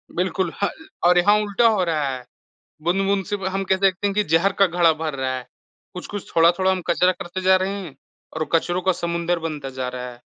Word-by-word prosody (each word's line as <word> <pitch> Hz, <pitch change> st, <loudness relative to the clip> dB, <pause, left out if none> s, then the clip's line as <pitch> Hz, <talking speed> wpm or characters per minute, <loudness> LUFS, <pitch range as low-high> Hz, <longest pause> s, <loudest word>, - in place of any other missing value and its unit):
बिल्कुल, 180 Hz, 0 st, -1 dB
ह -, -, +3 dB, 0.4 s
और 180 Hz, 0 st, +5 dB
यहाँ 205 Hz, +4 st, +5 dB
उल्टा 210 Hz, +3 st, +2 dB
हो 215 Hz, -4 st, +2 dB
रहा 160 Hz, -4 st, 0 dB
है। 125 Hz, -, -9 dB, 0.6 s
बूँद-बूँद 195 Hz, +3 st, +1 dB
से 205 Hz, -, -2 dB
ब 190 Hz, -, -7 dB
हम 195 Hz, 0 st, -1 dB
कह 190 Hz, -, +4 dB
सकते 195 Hz, +1 st, +1 dB
हैं 200 Hz, -, -2 dB
कि 210 Hz, -, +2 dB
ज़हर 165 Hz, +5 st, +2 dB
का 195 Hz, -, +7 dB
घड़ा 170 Hz, -1 st, +3 dB
भर 155 Hz, -1 st, -4 dB
रहा 130 Hz, -1 st, -2 dB
है। 125 Hz, -, -8 dB, 0.5 s
कुछ-कुछ, 195 Hz, +2 st, -7 dB
थोड़ा-थोड़ा 175 Hz, +3 st, +4 dB
हम 185 Hz, -1 st, -1 dB
कचरा 180 Hz, +1 st, +3 dB
करते 185 Hz, +1 st, -6 dB
जा 190 Hz, 0 st, +5 dB
रहे 185 Hz, +1 st, 0 dB
हैं, 150 Hz, -7 st, -10 dB, 0.4 s
और 160 Hz, 0 st, -3 dB
कचरों 175 Hz, +2 st, +1 dB
का 190 Hz, +1 st, +2 dB
समुंदर 170 Hz, 0 st, -1 dB
बनता 150 Hz, -4 st, -5 dB
जा 130 Hz, -1 st, -4 dB
रहा 125 Hz, 0 st, -6 dB
है। 120 Hz, 0 st, -16 dB
175 Hz, 220 wpm, -22 LUFS, 160-190 Hz, 0.6 s, का